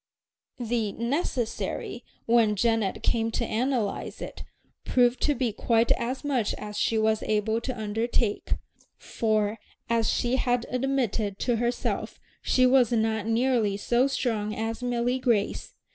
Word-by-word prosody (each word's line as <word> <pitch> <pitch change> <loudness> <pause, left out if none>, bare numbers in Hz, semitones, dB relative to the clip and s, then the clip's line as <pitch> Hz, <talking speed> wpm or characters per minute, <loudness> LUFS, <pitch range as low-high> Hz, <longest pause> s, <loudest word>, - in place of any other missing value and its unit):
The 230 -3 -1
"necessary," 240 -1 -2 0.2
when 230 -2 +4
Janet 225 -2 0
came 225 -1 +1
to - - 0
analyze 235 -2 -1
it, - - -7 0.4
proved 245 0 +2
to 295 - +2
be 240 -3 -1
quite 230 +1 +2
as 255 +4 0
much 260 -7 0
as 210 0 -7
she 225 - +1
was 220 0 +2
able 220 +1 0
to 245 -1 -4
undertake; 220 0 -1 0.4
for, 215 -1 -1 0.3
as 230 -1 +2
she 245 +1 +1
had 245 -2 +1
admitted 245 -6 0
to 240 -2 +1
herself, 240 +2 -2 0.2
she 255 - +3
was 250 -2 +4
not 220 -2 0
nearly 225 -3 +2
so 240 +5 +2
strong 220 -6 -1
as 225 +2 -3
Milly 245 +1 0
Grace. 235 -6 0
230 Hz, 135 wpm, -27 LUFS, 220-245 Hz, 0.4 s, when